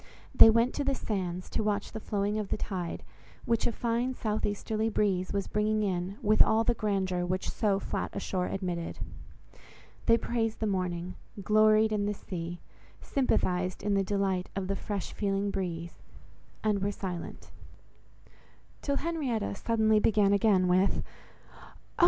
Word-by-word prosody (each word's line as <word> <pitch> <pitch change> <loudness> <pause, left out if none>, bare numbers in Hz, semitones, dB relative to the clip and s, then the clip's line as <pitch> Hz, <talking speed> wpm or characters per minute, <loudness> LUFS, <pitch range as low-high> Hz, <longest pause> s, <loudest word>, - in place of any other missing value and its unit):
They - - +10
went 230 +3 +3
to 290 - -1
the 275 -1 +1
sands, 185 -6 -3
to - - 0
watch 205 -1 -1
the 220 - -5
flowing 205 0 -1
of 210 - -3
the - - -1
tide, 180 -5 -4 0.4
which 230 -1 +1
a - - +1
fine 240 +2 -1
south 215 -2 -1
easterly 215 +2 -1
breeze 195 -4 0
was 200 -1 -1
bringing 215 0 0
in 185 0 -2
with 215 +1 +3
all 220 +1 +5
the 230 - +2
grandeur 190 -5 -1
which 185 +1 -2
so 205 -3 +1
flat - - -3
a - - -1
shore 180 -2 -2
admitted. 180 -3 -3 1.1
They 230 - +6
praised 225 -2 -1
the 220 - -1
morning; 180 -3 -2 0.3
gloried 215 +2 +4
in 205 -1 0
the 210 - -1
sea; 175 -2 -6 0.4
sympathized 185 -9 0
in 205 - +1
the 195 0 +2
delight 195 -2 -1
of 195 -1 -2
the 195 - -1
fresh 200 -1 -4
feeling 200 -1 -1
breeze—and 185 +3 -5
were 200 +1 0
silent; 185 -4 -6 1.3
till 280 - 0
Henrietta 280 -11 -1
suddenly 220 0 +2
began 205 -2 +3
again 200 -3 +4
with— 185 +2 +2 0.5
"Oh! - - -17
205 Hz, 155 wpm, -29 LUFS, 185-220 Hz, 1.3 s, They